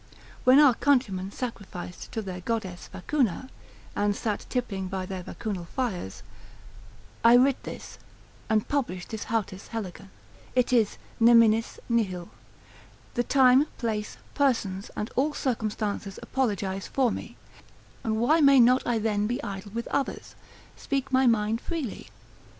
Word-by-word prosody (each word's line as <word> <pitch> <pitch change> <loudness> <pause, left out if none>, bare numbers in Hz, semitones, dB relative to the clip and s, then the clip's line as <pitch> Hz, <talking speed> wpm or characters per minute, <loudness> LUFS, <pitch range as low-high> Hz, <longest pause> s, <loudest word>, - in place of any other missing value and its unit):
When 255 +1 +7
our 285 -4 +7
countrymen 225 -9 +1
sacrificed 200 -8 -7
to 220 - -2
their 185 -2 -6
goddess 190 -4 -3
Vacuna, 255 - -1 0.5
and 205 0 +1
sat 210 -1 -3
tippling 200 -7 -2
by 190 0 -3
their 185 0 -5
Vacunal 185 -1 -5
fires. 180 - -4 1.0
I 230 +1 +8
writ 260 +2 +4
this, - - -9 0.5
and 215 -1 +2
published 235 -11 -2
this 220 -1 -5
οὕτις 205 -4 -3
ἕλεγεν, 195 -4 -6 0.5
it 250 0 +2
is 225 -4 +3 0.2
neminis 230 -1 +5
nihil. 190 -7 -1 0.8
The 240 - +1
time, 265 +2 +5
place, 215 -3 -3 0.2
persons, 215 -9 0
and 210 - -3
all 290 +3 +1
circumstances 215 -5 -2
apologise 200 -7 -1
for 260 -4 +1
me, - - -7 0.7
and 220 -1 0
why 295 +9 +3
may 275 -2 +7
not 250 +2 +6
I 240 -2 +2
then 210 -1 0
be 245 +2 -1
idle 200 -1 -6
with 235 +2 -4
others? 280 -1 -2 0.4
speak 275 -2 -3
my 260 0 +4
mind 225 0 +2
freely? 315 -10 -5
225 Hz, 135 wpm, -27 LUFS, 195-255 Hz, 1.0 s, I